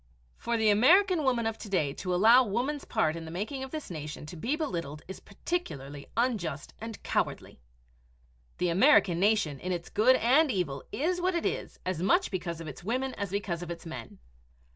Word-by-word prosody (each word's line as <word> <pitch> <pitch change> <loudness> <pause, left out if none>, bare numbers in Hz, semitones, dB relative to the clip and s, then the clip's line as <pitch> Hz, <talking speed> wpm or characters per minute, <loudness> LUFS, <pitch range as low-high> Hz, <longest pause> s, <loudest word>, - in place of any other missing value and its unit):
For 235 0 -2
the 220 -1 +4
American 345 - +5
Woman 245 -4 +1
of 225 0 -2
to 210 - -8
day 150 -8 +1
to 180 +3 -2
allow 225 +7 +7
woman's 250 +7 -2
part 155 +1 +1
in 165 - -6
the - - -8
making 210 - -4
of 265 - -6
this 305 -7 -6
nation 150 -2 -6
to 155 - -9
be 235 - -1
belittled 170 - -4
is 190 - -8
particularly 145 - -5
unjust 200 - -1
and 225 -1 -7
cowardly. - - -2 1.0
The 180 - +1
American 195 - +5
nation 195 -8 +2
in 185 - -4
its 175 -1 -4
good 250 +5 +4
and 275 +7 +4
evil 165 - -2
is 355 +5 -1
what 365 0 +1
it 340 - -1
is, - - -3
as 185 -3 -2
much 350 - +2
because 175 -3 -3
of 165 - -7
its 150 +3 -9
women 255 +6 -1
as 200 -2 -4
because 190 -3 -3
of 175 - -6
its 170 0 -7
men. 130 -8 -8
200 Hz, 195 wpm, -29 LUFS, 170-255 Hz, 1.0 s, allow